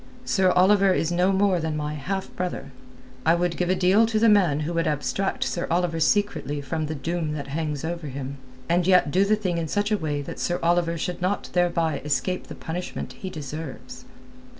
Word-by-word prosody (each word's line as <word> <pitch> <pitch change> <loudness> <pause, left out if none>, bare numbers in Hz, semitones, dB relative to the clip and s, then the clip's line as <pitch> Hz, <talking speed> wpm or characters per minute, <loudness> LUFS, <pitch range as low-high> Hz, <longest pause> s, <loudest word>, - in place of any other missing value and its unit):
Sir 190 -3 +3
Oliver 195 +1 +5
is 165 -2 0
no 180 +2 +3
more 190 -2 +2
than 160 -1 -2
my 150 0 -3
half 190 +6 -4
brother. 175 -6 -4 0.5
I 165 +1 +4
would 175 0 0
give 180 -1 -1
a 185 - +3
deal 190 +5 +4
to 220 -1 0
the 225 +1 +4
man 180 -8 +4
who 160 +3 -2
would 165 0 0
abstract 155 +6 -1
Sir 175 - -2
Oliver 170 -1 0
secretly 160 -5 +1
from 155 +3 -3
the 155 - -3
doom 160 +2 -2
that 140 -2 -6
hangs 150 0 -3
over 170 -1 -4
him, 135 0 -6 0.3
and 175 +1 +2
yet 180 -6 +4
do 185 +4 +4
the 215 +2 +3
thing 185 -5 -2
in 165 - -2
such 205 +5 -1
a 210 - +3
way 145 -3 -2
that - - -7
Sir 175 - 0
Oliver 170 0 +2
should 180 +2 -4
not 185 +3 -1
thereby 170 -4 +1
escape 180 +5 -1
the - - -8
punishment 175 +2 -5
he 190 - -7
deserves." 150 -3 -7
170 Hz, 205 wpm, -25 LUFS, 155-185 Hz, 0.5 s, Oliver